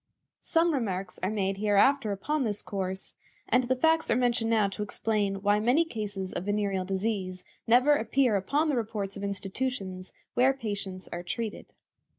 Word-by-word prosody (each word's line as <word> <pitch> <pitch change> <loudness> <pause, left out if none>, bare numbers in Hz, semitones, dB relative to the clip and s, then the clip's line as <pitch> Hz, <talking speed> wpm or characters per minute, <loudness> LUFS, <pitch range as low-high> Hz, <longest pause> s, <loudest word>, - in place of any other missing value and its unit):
Some 330 0 +2
remarks 195 -8 -2
are 185 - 0
made 195 -2 -1
hereafter 215 +4 +3
upon 280 +9 -1
this 210 -3 -2
course, 190 -1 -3 0.3
and 250 0 +3
the 260 +1 +1
facts 320 +4 +2
are - - +4
mentioned 240 -2 +1
now 220 -3 +3
to 195 - -6
explain 205 -2 -1
why 205 0 +4
many 250 +10 +3
cases 205 - -5
of 185 - -4
venereal 200 -2 0
disease 190 -2 -2 0.2
never 250 +6 +6
appear 260 -3 +2
upon 285 +11 +1
the 290 - +1
reports 210 -4 -2
of 200 - -6
institutions 195 -1 -4 0.2
where 255 +2 +4
patients 200 -7 -5
are 175 - -4
treated. 210 +5 -4
210 Hz, 165 wpm, -28 LUFS, 195-250 Hz, 0.3 s, never